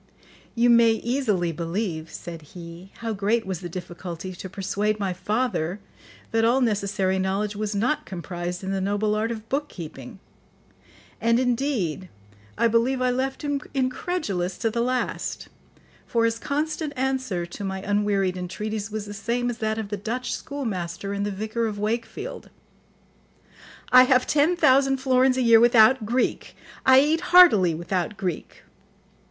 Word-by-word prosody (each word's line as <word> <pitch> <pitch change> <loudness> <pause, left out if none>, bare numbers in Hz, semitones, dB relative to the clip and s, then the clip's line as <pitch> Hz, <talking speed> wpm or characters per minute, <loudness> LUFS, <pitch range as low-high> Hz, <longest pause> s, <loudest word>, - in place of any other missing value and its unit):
"You 240 +1 +4
may 230 -1 +6
easily 225 -8 0
believe," 165 0 -3
said 170 -1 -8
he, 170 +4 -11
"how 225 -1 -2
great 215 +3 0
was 190 -3 -3
the 175 -1 -7
difficulty 175 0 -7
to 185 +1 -8
persuade 205 +2 -1
my 195 -2 -1
father 200 -2 -1 0.5
that 225 0 +2
all 240 +3 +4
necessary 200 -5 0
knowledge 195 +2 -1
was 210 0 -3
not 245 +9 0
comprised 175 -1 -5
in 190 - -3
the 195 -1 -1
noble 205 +2 0
art 215 +2 0
of 220 -1 -6
book 290 +4 -2
keeping; 150 -5 -9 1.0
and, 230 +1 +3
indeed, 240 - -1 0.5
I 235 - +4
believe 230 +3 +2
I 255 0 +2
left 265 +3 -2
him 285 -1 -1
incredulous 255 - -2
to 225 - -1
the 235 +1 -1
last, 255 +1 -2 0.6
for 230 -1 +2
his 230 0 0
constant 305 +2 -2
answer 260 -9 -1
to 175 +4 -8
my 190 -1 -3
unwearied 200 -2 +1
entreaties 205 +4 -4
was 215 -1 -4
the 205 - -7
same 235 +4 -1
as 230 - -8
that 220 0 -1
of 220 -2 -4
the 205 - -3
Dutch 235 +4 -3
schoolmaster 200 -8 -4
in 200 - -2
The 205 - -1
Vicar 220 +3 -2
of 210 -1 -4
Wakefield: 225 +3 -4 1.4
'I 255 0 +9
have 255 -1 +3
ten 305 +4 +3
thousand 270 -4 +4
florins 260 0 +3
a 255 - +2
year 230 -1 +7
without 235 0 +5
Greek, 245 +3 -1 0.3
I 260 0 +8
eat 310 +3 +1
heartily 335 - +6
without 175 +4 -2
Greek. 180 -4 -5
215 Hz, 155 wpm, -24 LUFS, 190-250 Hz, 1.4 s, I